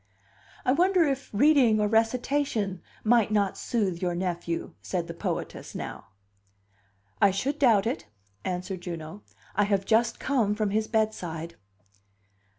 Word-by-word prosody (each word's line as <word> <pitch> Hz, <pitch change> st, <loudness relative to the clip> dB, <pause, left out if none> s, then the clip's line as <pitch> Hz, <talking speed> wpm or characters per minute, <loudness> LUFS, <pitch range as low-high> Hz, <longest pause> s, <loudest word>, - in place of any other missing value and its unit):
"I -, -, +4 dB
wonder 360 Hz, +4 st, +4 dB
if 275 Hz, -3 st, -1 dB
reading 245 Hz, -2 st, +5 dB
or 210 Hz, -, +2 dB
recitation 225 Hz, -3 st, 0 dB, 0.2 s
might 225 Hz, -1 st, +4 dB
not 200 Hz, -2 st, +2 dB
soothe 195 Hz, -7 st, -1 dB
your 175 Hz, -1 st, 0 dB
nephew?" 175 Hz, -2 st, -3 dB
said 180 Hz, -3 st, -2 dB
the 170 Hz, -, -7 dB
poetess, 170 Hz, -, -4 dB
now. -, -, -6 dB, 1.1 s
"I -, -, +7 dB
should 265 Hz, +10 st, -2 dB
doubt 225 Hz, -8 st, +5 dB
it," 225 Hz, -, -2 dB, 0.4 s
answered 185 Hz, 0 st, -3 dB
Juno. 170 Hz, +2 st, -7 dB, 0.3 s
"I 205 Hz, +1 st, +3 dB
have 200 Hz, -1 st, +1 dB
just 230 Hz, +2 st, +2 dB
come 230 Hz, -7 st, +1 dB
from 210 Hz, -2 st, 0 dB
his 215 Hz, +1 st, 0 dB
bedside." 175 Hz, -7 st, -2 dB
210 Hz, 135 wpm, -27 LUFS, 185-240 Hz, 1.1 s, I